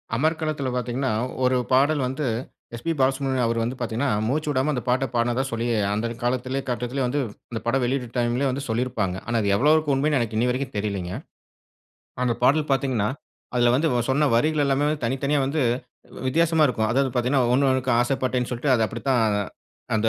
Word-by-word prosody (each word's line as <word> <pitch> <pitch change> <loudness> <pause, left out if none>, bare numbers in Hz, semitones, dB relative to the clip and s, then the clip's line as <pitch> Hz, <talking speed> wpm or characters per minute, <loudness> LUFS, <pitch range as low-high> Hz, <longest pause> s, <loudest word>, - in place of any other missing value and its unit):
அமர்க்களத்துல 155 0 0
பார்த்தீங்கன்னா, 125 +1 -1 0.3
1 125 0 +3
பாடல் 140 +2 +3
வந்து 135 +3 -3 0.5
எஸ்.பி. 120 +8 -3
பாலசுப்பிரமணியம் 135 -1 +1
அவரு 115 0 0
வந்து 120 +3 -2
பார்த்தீங்கன்னா, 120 +3 -1 0.2
மூச்சு 150 +5 -1
விடாம 140 +1 +1
அந்த 125 - -2
பாட்ட 130 +2 +2
பாடுனதா 120 +2 +1
சொல்லி, 115 +1 -2 0.3
அந்த 110 +3 -1 0.2
காலத்திலே 130 +2 -1
கட்டத்திலே 125 +2 -2
வந்து 140 +4 -1 0.3
இந்த 115 - -3
படம் 130 +2 +1
வெளியீட்டு 125 0 -1
டைம்லே 120 +3 +1
வந்து 135 +2 -4
சொல்லியிருப்பாங்க. 115 -5 -1
ஆனா, 120 - -1
அது 100 - 0
எவ்வளவுக்கு 150 +5 +3
உண்மைன்னு 145 +2 +2
எனக்கு 115 -2 -2
இன்னிவரைக்கும் 125 +2 -1
தெரியலைங்க. 100 -4 -3 1.1
அந்த 120 -2 +1
பாடல் 145 +4 +3
பார்த்தீங்கன்னா, 130 -6 +1 0.5
அதில 120 -1 +4
வந்து 155 +5 +2
இவன் 120 0 0
சொன்ன 145 +2 +3
வரிகள் 155 +4 +2
எல்லாமே 140 +1 +1 0.2
தனித்தனியா 140 +4 0
வந்து 150 +3 -1 0.7
வித்தியாசமா 160 +3 +3
இருக்கும். 110 -3 0
அதாவது 135 +2 +2
பார்த்தீங்கன்னா, 125 +2 +2
1- 135 +1 +3
1க்கு 130 -1 +1
ஆசைப்பட்டேன்ன்னு 125 0 0
சொல்ட்டு, 125 +3 +1
அது 115 - +2
அப்படித்தான் 120 +2 0 0.7
அந்த 110 +1 +2
130 Hz, 165 wpm, -24 LUFS, 120-140 Hz, 1.1 s, அதில